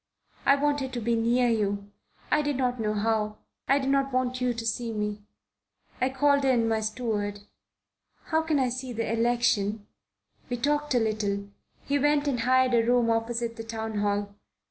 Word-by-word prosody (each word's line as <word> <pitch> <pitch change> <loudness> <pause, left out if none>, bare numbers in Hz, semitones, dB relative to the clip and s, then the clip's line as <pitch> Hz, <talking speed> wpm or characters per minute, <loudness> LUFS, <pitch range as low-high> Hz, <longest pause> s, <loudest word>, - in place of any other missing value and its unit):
I 275 - +7
wanted 285 -2 0
to 245 - -2
be 235 +1 0
near 240 +2 +2
you. 205 -3 -1 0.4
I 300 - +4
did 290 -1 -1
not 250 -1 0
know 215 -1 -1
how. 215 0 0 0.3
I 275 - +4
did 270 -1 0
not 275 0 +1
want 255 0 -1
you 250 0 +2
to 230 -1 -5
see 230 +1 -1
me. 210 -1 -3 0.8
I 255 - +3
called 280 +1 +2
in 245 -4 +3
my 225 -1 +1
steward. 215 -2 -2 0.8
'How 320 -1 +1
can 320 -2 0
I 260 -2 +2
see 255 +1 -4
the 230 -1 -2
election?' 225 -3 +1 0.6
We 245 - -2
talked 295 +2 0
a - - +5
little. 210 -3 -1 0.4
He 285 0 +1
went 295 +1 +2
and 260 -4 0
hired 255 +1 +3
a 230 -1 +4
room 240 0 +3
opposite 230 +1 -1
the 225 - -5
Town 220 -1 -4
Hall. 205 0 -1
235 Hz, 180 wpm, -27 LUFS, 220-260 Hz, 0.8 s, I